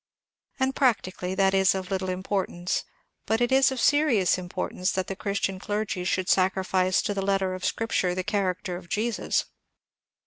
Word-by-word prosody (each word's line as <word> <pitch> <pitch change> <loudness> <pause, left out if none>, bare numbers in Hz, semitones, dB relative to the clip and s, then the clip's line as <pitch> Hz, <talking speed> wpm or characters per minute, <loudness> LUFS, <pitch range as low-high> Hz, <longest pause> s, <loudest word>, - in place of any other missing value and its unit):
And 265 0 +1
practically 190 -7 0
that 195 0 +3
is 190 0 +4
of 190 0 -5
little 190 -1 -1
im 185 0 -3
portance, 185 -3 -2 0.4
but 220 +1 +1
it 240 +1 +1
is 265 0 +5
of 265 - -3
serious 290 - +3
importance 180 +1 -2
that 190 -1 -1
the 195 - -5
Christian 200 -1 -2
clergy 205 -2 -3
should 185 0 0
sacrifice 185 0 +2
to 205 - -1
the 195 - -2
letter 195 -1 0
of 185 0 -7
scripture 190 -5 0
the 185 - -2
character 185 -2 -1
of 175 -1 -13
Jesus. 225 +4 0
190 Hz, 170 wpm, -26 LUFS, 185-210 Hz, 0.4 s, is